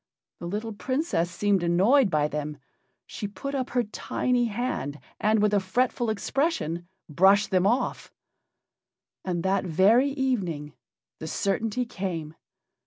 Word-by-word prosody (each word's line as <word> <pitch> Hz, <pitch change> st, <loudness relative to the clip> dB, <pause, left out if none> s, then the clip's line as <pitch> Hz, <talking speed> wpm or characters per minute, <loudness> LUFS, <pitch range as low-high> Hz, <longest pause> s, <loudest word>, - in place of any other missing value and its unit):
The 170 Hz, -, -6 dB
little 215 Hz, +4 st, -3 dB
Princess 255 Hz, -, -1 dB
seemed 195 Hz, +2 st, +1 dB
annoyed 195 Hz, +9 st, +4 dB
by 150 Hz, -3 st, +2 dB
them. 150 Hz, 0 st, -4 dB, 0.5 s
She 205 Hz, -, -5 dB
put 205 Hz, +8 st, -6 dB
up 260 Hz, -2 st, -2 dB
her 245 Hz, -1 st, +1 dB
tiny 240 Hz, +3 st, -1 dB
hand 205 Hz, -, -3 dB, 0.2 s
and, 215 Hz, +1 st, +3 dB
with 210 Hz, 0 st, +2 dB
a 205 Hz, -, +4 dB
fretful 240 Hz, +4 st, 0 dB
expression, 200 Hz, -, -1 dB, 0.2 s
brushed 195 Hz, +6 st, +4 dB
them 185 Hz, 0 st, +3 dB
off. 245 Hz, +4 st, -1 dB, 1.1 s
And 175 Hz, -2 st, -2 dB
that 190 Hz, +1 st, +1 dB
very 200 Hz, -, +4 dB
evening 200 Hz, -, -2 dB, 0.5 s
the 160 Hz, -, -6 dB
certainty 220 Hz, +7 st, -1 dB
came. 175 Hz, -8 st, -4 dB
200 Hz, 130 wpm, -26 LUFS, 175-245 Hz, 1.1 s, annoyed